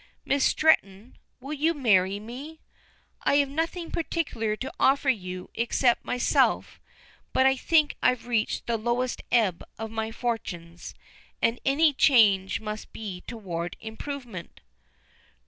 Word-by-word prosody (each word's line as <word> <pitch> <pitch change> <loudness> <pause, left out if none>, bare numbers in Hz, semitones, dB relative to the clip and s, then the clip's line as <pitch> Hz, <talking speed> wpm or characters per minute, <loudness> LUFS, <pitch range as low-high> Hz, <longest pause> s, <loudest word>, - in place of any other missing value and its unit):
Miss 275 0 +1
Stretton, 225 -8 +2 0.2
will 275 +4 -6
you 315 +3 +1
marry 200 -7 +3
me? 265 +9 -9 0.6
I - - +2
have 285 -1 +3
nothing 330 +4 -3
particular 285 -10 -2
to 265 +4 -6
offer 270 0 +4
you 185 -5 -6
except 240 +1 +1
myself, 245 - +1 0.5
but 260 - +4
I 265 0 +5
think 305 +2 +2
I've 250 -2 +2
reached 230 -3 -1
the 235 -1 0
lowest 240 +3 -1
ebb 215 -8 +2
of 220 0 -6
my 220 0 -3
fortunes, 175 -8 -5 0.4
and 230 +1 +1
any 295 +3 +3
change 210 -9 +4
must 215 -1 -6
be 195 -5 -7
toward 175 -7 -5
improvement." 225 -3 -7
235 Hz, 130 wpm, -26 LUFS, 210-275 Hz, 0.6 s, I